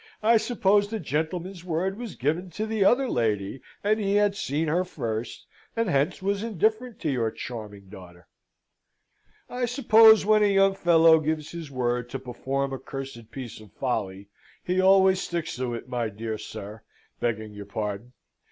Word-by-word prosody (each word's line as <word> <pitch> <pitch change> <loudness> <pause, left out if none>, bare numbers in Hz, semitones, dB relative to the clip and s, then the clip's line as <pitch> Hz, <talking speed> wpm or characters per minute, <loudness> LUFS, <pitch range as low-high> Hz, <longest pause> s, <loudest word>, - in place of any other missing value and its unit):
"I 230 +1 +6
suppose 205 -3 +2
the 220 +1 -4
gentleman's 170 +4 -3
word 180 +2 -1
was 235 -5 -6
given 160 +7 -1
to 215 - -1
the 220 -2 0
other 260 +6 +4
lady, 110 - -1 0.2
and 215 +2 +2
he 200 -1 0
had 205 -1 +3
seen 160 -5 -1
her 170 +4 +1
first, 115 -10 -5 0.3
and 230 -1 0
hence 150 +5 0
was 200 +1 0
indifferent 220 +2 -1
to 155 - 0
your 120 -4 0
charming 105 -4 -8
daughter." 90 -3 -13 1.2
"I 245 0 -2
suppose 225 -4 +6
when 215 0 +4
a 210 - +5
young 195 0 +4
fellow 165 -3 +5
gives 155 0 -2
his 170 -3 -7
word 125 -2 -1
to 135 - -4
perform 135 +2 -3
a 135 - -4
cursed 135 -4 -8
piece 120 -5 -8
of 105 -3 -16
folly, 100 -6 -3 0.4
he 185 +1 +1
always 190 0 +5
sticks 170 -2 -3
to 125 -2 -2
it, 115 - -8
my 120 -3 -2
dear 110 +1 -5
sir, 105 +3 -8 0.4
begging 110 -2 -2
your 105 0 -8
pardon. 105 +2 -4
155 Hz, 170 wpm, -26 LUFS, 120-195 Hz, 1.2 s, I